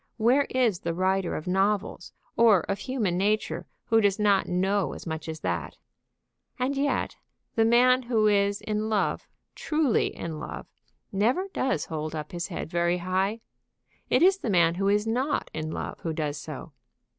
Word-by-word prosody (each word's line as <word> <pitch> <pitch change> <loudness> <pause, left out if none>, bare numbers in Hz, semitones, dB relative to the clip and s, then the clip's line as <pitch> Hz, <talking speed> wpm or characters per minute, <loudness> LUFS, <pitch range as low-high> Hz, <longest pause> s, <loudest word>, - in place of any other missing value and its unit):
Where 250 +5 +3
is 240 -8 +1
the 170 0 -3
writer 185 0 0
of 155 - -5
novels, 195 0 0 0.2
or 225 -6 +5
of 195 0 -3
human 215 -9 -1
nature, 210 +2 0 0.2
who 225 0 +3
does 200 -2 +2
not 205 -2 +3
know 190 +2 0
as - - -9
much 160 -1 -5
as 160 -1 -6
that? - - -3 0.8
And 265 +2 -1
yet 280 +1 -1 0.4
the 225 - +3
man 250 +2 +5
who 235 -3 +1
is 200 -1 +2
in 215 0 -2
love, 215 -2 0 0.3
truly 300 -6 +1
in 160 -2 -6
love, - - -7 0.5
never 245 - +1
does 240 - 0
hold 155 0 -4
up 150 -1 -5
his 175 0 -4
head 175 - -5
very 170 +1 +1
high. 190 +5 -1 0.7
It - - +4
is 385 +1 +5
the 240 - -3
man 170 -4 +4
who 195 +3 -1
is 205 +1 +2
not 260 +5 -1
in 155 0 -4
love - - -5
who 165 - -3
does 150 -2 -3
so. 155 +1 -8
200 Hz, 170 wpm, -27 LUFS, 175-230 Hz, 0.8 s, or